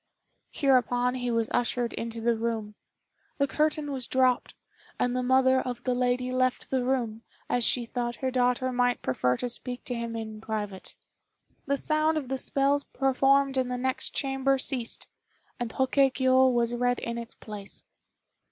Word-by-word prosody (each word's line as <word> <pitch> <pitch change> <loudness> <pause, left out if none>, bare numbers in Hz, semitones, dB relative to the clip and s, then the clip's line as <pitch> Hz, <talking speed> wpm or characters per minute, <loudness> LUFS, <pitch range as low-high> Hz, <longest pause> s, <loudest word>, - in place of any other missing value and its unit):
Hereupon 250 -3 +2
he 245 -1 -2
was 230 -1 +1
ushered 245 0 0
into 230 0 -5
the 235 0 +2
room. 225 -2 -3 0.6
The 280 - +3
curtain 300 +1 0
was 260 -3 -3
dropped, 255 -1 +2 0.4
and 245 0 0
the 255 - +1
mother 260 +1 +4
of 245 -1 -5
the 255 - +1
lady 250 0 0
left 255 0 0
the 260 -2 +1
room, 240 -4 -1 0.3
as 245 - +1
she 240 +1 +3
thought 240 0 -3
her 260 -1 -2
daughter 250 0 +1
might 245 0 +1
prefer 125 -1 +1
to 250 - -2
speak 245 +1 -5
to 250 - -4
him 235 -1 -4
in 220 -1 -6
private. 210 -3 -5 0.7
The 280 +1 +1
sound 310 +2 +1
of 275 -5 -4
the 265 0 -1
spells 280 +2 +1
performed 270 0 +2
in 260 -1 +1
the 250 0 -2
next 260 +1 -2
chamber 270 0 +1
ceased, 255 -3 -3 0.5
and 240 -2 -3
Hoke 265 +2 0
kiô 260 -1 +4
was 240 -1 +1
read 245 0 +1
in 235 0 -4
its 235 0 -5
place. 205 -2 -9
250 Hz, 170 wpm, -28 LUFS, 235-265 Hz, 0.7 s, mother